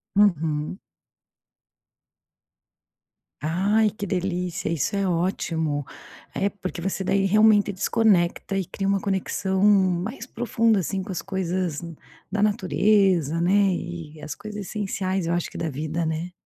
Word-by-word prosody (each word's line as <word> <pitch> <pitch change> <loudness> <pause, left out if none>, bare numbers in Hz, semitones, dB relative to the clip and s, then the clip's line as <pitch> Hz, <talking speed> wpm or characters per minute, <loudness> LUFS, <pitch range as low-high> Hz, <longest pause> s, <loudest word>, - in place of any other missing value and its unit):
Uhum. 165 -4 +2 2.6
Ai, 200 +7 +2
que 210 0 -6
delícia, 180 -1 -2
isso 165 +4 -1
é 200 -1 +1
ótimo, 165 -4 -1 0.5
eh, 195 - +1
porque 185 -3 -6
você 190 +2 -2
daí, 195 +1 +2
realmente, 210 0 +5
desconecta 195 -2 +2
e 195 - +1
cria 195 +3 -4
uma 195 0 +2
conexão 190 -1 -1
mais 200 +4 +2
profunda, 230 -2 +1
assim, 190 +2 -2
com 190 +1 -6
as 180 - -4
coisas 185 -4 -2 0.5
da 210 0 +1
natureza, 195 - +2
né, 195 +2 +3
e 165 -3 -6
as 150 0 -6
coisas 210 -1 -7
essenciais, 190 -3 -2
eu 170 - 0
acho 175 0 -1
que - - -10
da 165 - -2
vida, 155 +4 -2
né. 160 +3 -3
190 Hz, 130 wpm, -24 LUFS, 170-205 Hz, 2.6 s, realmente